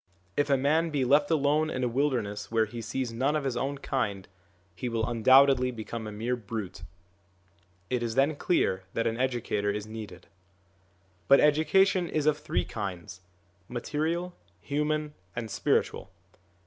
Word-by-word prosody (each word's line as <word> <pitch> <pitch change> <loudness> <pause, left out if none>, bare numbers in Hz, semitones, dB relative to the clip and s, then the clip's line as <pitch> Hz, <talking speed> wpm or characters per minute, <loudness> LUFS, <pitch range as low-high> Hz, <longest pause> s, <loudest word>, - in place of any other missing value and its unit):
If 145 0 +1
a 140 - +4
man 155 +5 +2
be 140 -4 0
left 145 +3 +4
alone 155 0 +2
in 130 - -2
a - - +2
wilderness 120 -6 -1
where 115 -1 +3
he 115 +2 -7
sees 115 +2 -3
none 135 +6 +1
of 150 - 0
his 135 -3 -1
own 140 +3 -2
kind, 105 -9 -2 0.5
he 120 +8 -4
will 115 -1 -1
undoubtedly 130 +2 +5
become 115 -1 -6
a - - -6
mere 115 +4 -2
brute; 105 -4 -6 1.1
it 125 -1 -1
is 115 -1 -2
then 140 +3 +3
clear 120 - +1
that 115 - 0
an 115 0 0
educator 120 -5 0
is 105 0 -2
needed. 110 -5 -9 1.0
But 140 - +7
education 175 +4 +3
is 155 -2 -1
of 150 0 +2
three - - -1
kinds: 95 -2 -6 0.5
material, 160 +8 -2 0.3
human, 150 +4 -1 0.2
and 115 -2 -4
spiritual. - - 0
125 Hz, 155 wpm, -28 LUFS, 110-145 Hz, 1.1 s, But